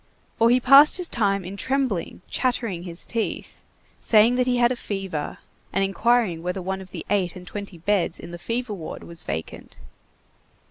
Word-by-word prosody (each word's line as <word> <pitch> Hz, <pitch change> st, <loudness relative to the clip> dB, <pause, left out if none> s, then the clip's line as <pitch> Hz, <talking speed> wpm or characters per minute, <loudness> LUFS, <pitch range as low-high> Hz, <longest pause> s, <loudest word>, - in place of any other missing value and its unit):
Or 230 Hz, +1 st, +5 dB
he 250 Hz, +1 st, +5 dB
passed 275 Hz, +6 st, +7 dB
his 360 Hz, -2 st, -3 dB
time 200 Hz, -, 0 dB
in 190 Hz, +2 st, -6 dB
trembling, 255 Hz, -7 st, -2 dB
chattering 235 Hz, -8 st, -1 dB
his 170 Hz, -1 st, -5 dB
teeth, 230 Hz, -2 st, -4 dB, 0.4 s
saying 220 Hz, +2 st, +5 dB
that 250 Hz, 0 st, +1 dB
he 250 Hz, -1 st, +2 dB
had 240 Hz, 0 st, +4 dB
a -, -, 0 dB
fever, 195 Hz, -9 st, -4 dB, 0.3 s
and 195 Hz, -, +1 dB
inquiring 195 Hz, -3 st, +2 dB
whether 180 Hz, +2 st, -3 dB
one 190 Hz, +1 st, -3 dB
of 190 Hz, -, -11 dB
the -, -, -7 dB
eight 190 Hz, -4 st, +1 dB
and 180 Hz, -1 st, -10 dB
twenty 200 Hz, -1 st, -7 dB
beds 180 Hz, 0 st, 0 dB
in 170 Hz, -, -9 dB
the 175 Hz, -, -8 dB
fever 235 Hz, +3 st, -3 dB
ward 170 Hz, -6 st, -7 dB
was 170 Hz, -1 st, -7 dB
vacant. 80 Hz, +1 st, -6 dB
200 Hz, 180 wpm, -24 LUFS, 180-240 Hz, 0.4 s, passed